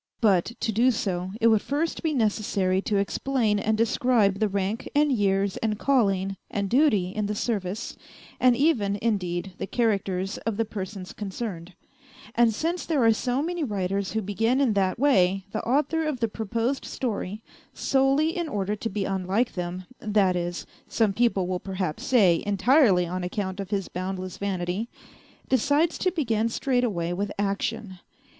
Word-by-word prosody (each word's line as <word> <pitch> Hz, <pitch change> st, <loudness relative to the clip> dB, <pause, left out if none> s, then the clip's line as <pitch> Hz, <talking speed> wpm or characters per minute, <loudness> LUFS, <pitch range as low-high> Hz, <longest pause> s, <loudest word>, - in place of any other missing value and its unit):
But, 205 Hz, -1 st, +2 dB
to 225 Hz, -, 0 dB
do 235 Hz, +5 st, +3 dB
so, 185 Hz, -6 st, -2 dB
it 230 Hz, -, +1 dB
would 220 Hz, -2 st, +4 dB
first 305 Hz, +4 st, -2 dB
be 320 Hz, -, 0 dB
necessary 205 Hz, -5 st, +1 dB
to 205 Hz, 0 st, 0 dB
explain 215 Hz, +1 st, 0 dB
and 215 Hz, +1 st, 0 dB
describe 225 Hz, -3 st, +2 dB
the 215 Hz, -1 st, +2 dB
rank 200 Hz, +4 st, -2 dB
and 295 Hz, 0 st, +4 dB
years 200 Hz, -4 st, +1 dB
and 215 Hz, -2 st, -1 dB
calling 195 Hz, -7 st, +1 dB
and 200 Hz, -5 st, -2 dB
duty 240 Hz, -9 st, +3 dB
in 210 Hz, 0 st, -2 dB
the 210 Hz, -, -2 dB
service, 205 Hz, -2 st, -3 dB, 0.4 s
and 250 Hz, -1 st, +5 dB
even, 235 Hz, -8 st, +2 dB
indeed, 190 Hz, -4 st, -1 dB
the -, -, -3 dB
characters 195 Hz, -4 st, -1 dB
of 225 Hz, -3 st, -3 dB
the 225 Hz, -, +1 dB
persons 195 Hz, -2 st, -6 dB
concerned; 190 Hz, -4 st, -6 dB, 0.6 s
and 235 Hz, -1 st, +4 dB
since 330 Hz, +10 st, -2 dB
there 295 Hz, -7 st, +1 dB
are 225 Hz, -1 st, +6 dB
so 250 Hz, +5 st, -1 dB
many 345 Hz, 0 st, -2 dB
writers 195 Hz, -4 st, -2 dB
who 220 Hz, -1 st, -1 dB
begin 225 Hz, +6 st, +1 dB
in 265 Hz, -6 st, +3 dB
that 190 Hz, -2 st, +1 dB
way 195 Hz, -8 st, +3 dB
the 220 Hz, -, -2 dB
author 300 Hz, +5 st, +1 dB
of 290 Hz, -5 st, -2 dB
the 230 Hz, -, +1 dB
proposed 230 Hz, +5 st, -2 dB
story, 215 Hz, -3 st, -4 dB, 0.3 s
solely 275 Hz, +5 st, +2 dB
in 345 Hz, -3 st, -2 dB
order 205 Hz, -3 st, -1 dB
to 225 Hz, +2 st, -4 dB
be 195 Hz, -1 st, -2 dB
unlike 195 Hz, +5 st, 0 dB
them 180 Hz, 0 st, -4 dB
(that 205 Hz, -4 st, +2 dB
is, 175 Hz, 0 st, -3 dB, 0.2 s
some 220 Hz, -4 st, +1 dB
people 225 Hz, -4 st, +2 dB
will 180 Hz, 0 st, -2 dB
perhaps 185 Hz, -5 st, -4 dB
say, 195 Hz, -10 st, +4 dB
entirely 205 Hz, -, +4 dB
on 180 Hz, +1 st, -4 dB
account 190 Hz, +1 st, -3 dB
of 195 Hz, -1 st, -5 dB
his 200 Hz, -2 st, -1 dB
boundless 185 Hz, 0 st, -5 dB
vanity), 195 Hz, +2 st, -2 dB, 0.6 s
decides 285 Hz, +6 st, +2 dB
to 370 Hz, -, +2 dB
begin 230 Hz, -, 0 dB
straightaway 230 Hz, -10 st, 0 dB
with 200 Hz, +3 st, -2 dB
action. 200 Hz, 0 st, -2 dB
210 Hz, 165 wpm, -26 LUFS, 190-245 Hz, 0.6 s, are